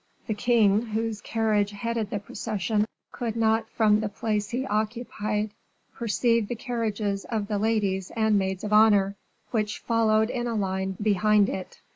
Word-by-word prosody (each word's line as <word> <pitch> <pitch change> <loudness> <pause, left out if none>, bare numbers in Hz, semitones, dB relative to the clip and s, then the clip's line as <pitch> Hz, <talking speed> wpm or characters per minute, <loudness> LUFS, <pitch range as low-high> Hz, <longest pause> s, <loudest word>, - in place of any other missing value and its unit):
The 220 - -1
king, 215 -2 +3
whose 225 -1 -3
carriage 215 -2 +1
headed 220 +1 -3
the 205 - -2
procession, 210 +1 -1 0.3
could 230 -2 -3
not 225 0 +1
from 215 -2 +3
the 215 -1 -2
place 210 0 -2
he 255 +3 -2
occupied 215 -1 -2 0.4
perceive 230 -1 +1
the 240 - -3
carriages 215 -4 -2
of 215 -3 -2
the 205 -1 -1
ladies 200 -4 0
and 220 -1 +2
maids 190 -1 0
of 210 0 -2
honor, 205 -2 +5 0.4
which 215 -3 -1
followed 220 -1 +2
in 240 -1 -2
a 230 - -2
line 190 -2 -2
behind 210 0 +3
it. 185 - -6
215 Hz, 155 wpm, -26 LUFS, 205-225 Hz, 0.4 s, honor